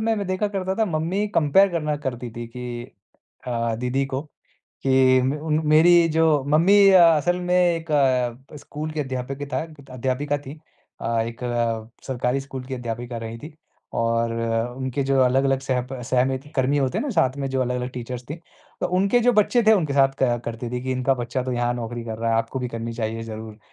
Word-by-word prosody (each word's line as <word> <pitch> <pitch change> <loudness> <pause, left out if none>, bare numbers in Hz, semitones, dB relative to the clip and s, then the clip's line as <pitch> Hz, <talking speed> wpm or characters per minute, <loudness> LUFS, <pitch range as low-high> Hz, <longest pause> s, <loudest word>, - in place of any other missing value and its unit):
मैं 205 - -3
व - - -7
देखा 185 +3 0
करता 190 -2 -2
था 220 +1 +2
मम्मी 175 +5 -1
कंपेयर 170 +6 +5
करना 150 -3 -1
करती 120 -1 -4
थी 120 +1 -7
कि 120 0 -6 0.6
अ, 115 -2 -1
दीदी 125 +4 -1
को 135 0 -3 0.7
कि 130 -1 +5
मे 135 +3 0
उन 155 0 0
मेरी 165 +2 +6
जो 160 -3 +3
मम्मी 170 +7 +5
अ 185 -2 +7
असल 175 +4 0
में 180 0 0
एक 170 -2 +1 0.6
अ, - - -9
स्कूल 150 +2 -6
के 155 - -3
अध्यापिक 135 0 -4
था - - -1
ग 150 -3 -16
त - - -16
अध्यापिका 135 +3 -1
थीं। 140 0 -9 0.5
अ, 115 0 0
एक 115 +2 -7
अ, 115 -2 -1 0.2
सरकारी 130 0 -1
स्कूल 135 -1 -7
की 130 0 -5
अध्यापिका 120 0 -5
रहीं 115 0 -6
थी 150 +4 -10 0.4
और 115 0 +1
अ, 115 0 -1
उनके 130 +1 -2
जो 135 0 +1
अलग-अलग 135 +1 +3
सहप 130 -1 -2 0.2
सहमित 130 +1 +1
कर्मी 135 +2 +2
होते 130 -2 0
हैं - - -1
ना - - -2
साथ 150 - +1
में 135 -1 -2
जो 130 0 0
अलग-अलग 125 0 -2
टीचर्स 125 0 -6
थे। - - -2 0.5
तो - - +1
उनके 200 +5 +3
जो 245 +1 +4
बच्चे 230 +3 +3
थे 220 - +8
उनके 165 -9 +2
साथ 135 -1 +5
क 120 -2 +2
करती 115 +1 -5
थी 125 0 -3
कि 130 - -2
इनका 130 +1 +1
बच्चा 125 +1 -3
तो 125 0 -3
यहाँ 120 0 0
नौकरी 120 0 -5
कर 110 -1 -5
रहा 115 0 0
है 115 - +2
आपको 115 +4 -1
भी 125 -1 -3
करनी 115 0 -5
चाहिए 115 0 -3
ज़रूर। 110 -1 -8
130 Hz, 210 wpm, -23 LUFS, 120-155 Hz, 0.7 s, थे